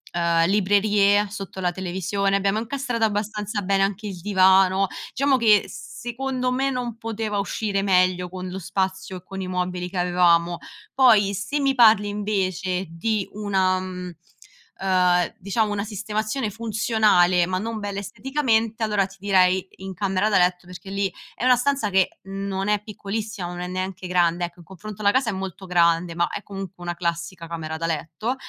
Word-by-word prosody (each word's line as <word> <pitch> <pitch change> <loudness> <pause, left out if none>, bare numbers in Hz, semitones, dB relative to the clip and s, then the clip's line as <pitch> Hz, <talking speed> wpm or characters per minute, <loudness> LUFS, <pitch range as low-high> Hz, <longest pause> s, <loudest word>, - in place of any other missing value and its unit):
ehm, 170 -1 +2
librerie 205 +1 +3
sotto 195 -1 -7
la 180 -1 0
televisione, 190 +2 -1
abbiamo 200 +2 +1
incastrato 240 0 -2
abbastanza 210 0 -1
bene 195 +1 +1
anche 200 +2 -2
il 190 -3 -6
divano. 190 0 +4 0.3
Diciamo 275 0 +2
che 215 -4 +4
s 155 -3 -10
secondo 255 +1 -2
me 265 +2 +1
non 245 -3 -3
poteva 220 -2 -3
uscire 200 0 -1
meglio, 185 -2 +2
con 185 0 -6
lo 190 +1 -5
spazio 190 +1 -3
e 180 - -13
con 195 +1 -8
i 185 - -4
mobili 180 0 -2
che 185 - -6
avevamo. 175 -1 +3 0.4
Poi, 220 -7 +5
se 215 +9 -2
mi 275 -1 +2
parli 220 -4 +6
invece 190 -3 -1
di 200 +5 -1
una 190 -3 +1
mhmm, 180 -1 -6 0.7
ehm, 180 -2 +2
diciamo 210 +3 0
una 200 -1 -1
sistemazione 215 +3 -3
funzionale 210 -5 +2
ma 185 0 -1
non 220 +3 -4
bella 200 -1 -4
esteticamente, 225 0 -1
allora 210 -3 +2
ti 195 - -16
direi, 185 -1 +3
in 190 0 -7
camera 195 +1 0
da 200 - +3
letto 180 -1 +1
perché 180 +1 -10
lì 200 -1 -1 0.2
è - - -6
una 255 - +6
stanza 255 -3 0
che 190 -1 +1
non 195 0 -4
è 210 0 +1
piccolissima, 210 -2 -5
ma 175 - -6
non 175 - -6
è - - -4
neanche 185 0 -4
grande, 175 -1 +2
ecco, 175 +1 -11
in 170 - -14
confronto 205 +3 -9
alla 205 -1 +4
casa 260 0 +1
è - - -2
molto 190 0 -6
grande 170 -1 +2
ma 170 0 +1
è 205 - -6
comunque 195 -2 -8
una 175 0 -2
classica 170 0 -3
camera 160 -1 -5
da 165 - -2
letto. 165 - -3
195 Hz, 175 wpm, -23 LUFS, 180-215 Hz, 0.7 s, parli